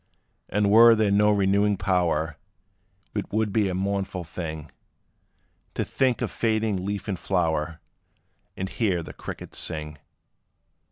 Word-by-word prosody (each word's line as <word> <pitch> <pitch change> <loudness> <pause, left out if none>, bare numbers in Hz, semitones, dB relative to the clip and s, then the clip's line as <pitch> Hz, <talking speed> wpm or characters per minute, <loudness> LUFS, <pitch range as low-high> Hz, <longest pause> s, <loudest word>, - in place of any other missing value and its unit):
And 105 0 +2
were 115 +2 +8
there 110 -2 +2
no 105 +1 +4
renewing 100 0 +2
Power, 85 -5 0 0.8
'T - - 0
would 110 -1 0
be 105 -3 +2
a 90 - -2
mournful 95 -1 -2
thing, 80 -3 -6 1.0
To - - -1
think 130 -3 +1
of - - -2
fading 110 -4 0
leaf 100 0 -4
and 95 -4 -3
flower; 85 -4 -1 0.8
And 95 - -2
hear 95 -5 0
the - - -9
crickets - - -8
sing. 75 -1 -4
95 Hz, 130 wpm, -25 LUFS, 85-105 Hz, 1.0 s, were